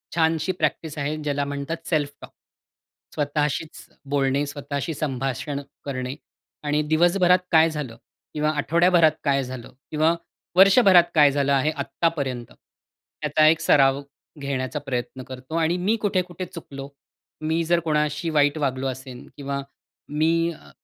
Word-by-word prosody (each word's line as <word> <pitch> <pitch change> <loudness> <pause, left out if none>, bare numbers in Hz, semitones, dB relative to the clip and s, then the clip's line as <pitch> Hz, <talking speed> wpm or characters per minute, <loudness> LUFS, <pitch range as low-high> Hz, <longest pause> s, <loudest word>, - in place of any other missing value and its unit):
छानशी 160 +1 +2
प्रॅक्टिस 155 -2 -2
आहे 145 +1 -1
ज्याला 145 -2 -1
म्हणतात 145 +4 -5
सेल्फ 150 -4 +1
टॉक. - - -11 0.8
स्वतःशीच 150 +1 -2 0.2
बोलणे, 140 0 +1
स्वतःशी 145 +2 -4
संभाषण 135 0 -3 0.2
करणे 130 -2 -4 0.5
आणि 150 0 +1
दिवसभरात 175 +3 +4
काय 160 -1 +6
झालं 150 -7 -5 0.4
किंवा 150 0 0
आठवड्याभरात 170 +2 +4
काय 140 -2 +2
झालं 130 -2 -8 0.2
किंवा 155 +2 +3 0.4
वर्षभरात 195 -2 +7
काय 145 -2 +6
झालं 140 0 +1
आहे, 140 +3 +2
आत्तापर्यंत, 140 -5 -2 0.7
याचा 150 +1 +3
एक 160 +1 +4
सराव 135 -1 +4 0.4
घेण्याचा 140 +1 -3
प्रयत्न 130 -2 -4
करतो 130 +4 -8
आणि 165 +1 +1
मी 195 +5 +1
कुठे-कुठे 185 -3 -1
चुकलो. 140 -5 -9 0.5
मी 160 +2 0
जर 170 +1 +2
कोणाशी 150 0 0
वाईट 145 -1 +2
वागलो 135 -3 -1
असेन 130 -1 -7
किंवा 140 -1 -3 0.5
मी 165 +3 +1
अ, 160 - -14
150 Hz, 130 wpm, -24 LUFS, 140-165 Hz, 0.8 s, वर्षभरात